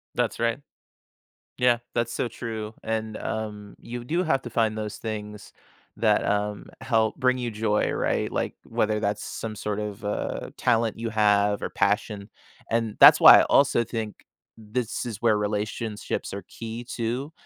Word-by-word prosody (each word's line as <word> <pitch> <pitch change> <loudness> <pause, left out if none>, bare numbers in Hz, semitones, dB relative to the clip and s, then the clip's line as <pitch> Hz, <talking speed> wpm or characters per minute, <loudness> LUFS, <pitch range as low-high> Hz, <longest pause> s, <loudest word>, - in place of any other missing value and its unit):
That's - - -1
right. 115 +3 0 1.0
Yeah. 125 -1 +3 0.2
That's 120 -1 0
so 120 - -1
true, 110 -2 -6
and, 110 -1 -2
um, 105 -2 -5
you 120 0 -7
do 170 +7 0
have 135 -6 +1
to 120 - -7
find 110 -1 +1
those 105 -1 -5
things 105 -2 -6 0.4
that, - - +2
um, 105 0 -1
help 110 -3 +1
bring 130 -1 +2
you 120 -1 -2
joy, 105 -1 0
right? - - -1
Like, - - -2
whether 105 0 0
that's 105 0 -1
some 110 -2 -5
sort 105 +1 -3
of, 105 0 -6
uh, 105 - -3
talent 115 -3 +1
you 115 -1 -3
have 105 -1 +3
or - - -3
passion, 100 0 -1 0.4
and 115 -2 0
that's - - +10
why - - +11
I - - +5
also 135 -4 +4
think 110 -2 -5 0.3
this 115 +3 -3
is 115 -4 -5
where 110 -3 +4
relationships 105 0 -3
are 100 -1 -5
key, 115 +1 -7
too. 125 +5 -3
110 Hz, 160 wpm, -25 LUFS, 105-115 Hz, 1.0 s, why